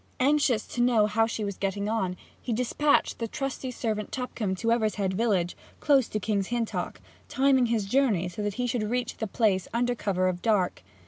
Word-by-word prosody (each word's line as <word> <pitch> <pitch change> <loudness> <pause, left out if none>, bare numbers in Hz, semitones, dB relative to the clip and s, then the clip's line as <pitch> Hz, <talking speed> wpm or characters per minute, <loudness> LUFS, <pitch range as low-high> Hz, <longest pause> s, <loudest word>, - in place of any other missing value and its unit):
Anxious 270 -4 +3
to 240 - -2
know 240 -3 +4
how 225 +2 +2
she 225 -1 -3
was 200 -2 -4
getting 200 +1 -1
on, 190 -5 -1 0.2
he 240 - -2
despatched 250 +5 +1
the 230 - -2
trusty 270 +1 -4
servant 220 -4 -3
Tupcombe 235 -6 -3
to 230 +5 -2
Evershead 215 -4 +1
village, 190 -5 +1 0.2
close 275 -5 +4
to 215 - -3
King's 200 -1 -1
Hintock, 240 -2 -2 0.3
timing 270 -3 +3
his 225 -3 0
journey 210 -6 +2
so 175 +4 -6
that 205 -1 -2
he 250 - -1
should 245 -1 -1
reach 245 0 -2
the 220 - -3
place 195 -3 +1
under 245 +1 +2
cover 190 -5 0
of 180 -1 -2
dark. 205 - +1
225 Hz, 190 wpm, -27 LUFS, 200-245 Hz, 0.3 s, know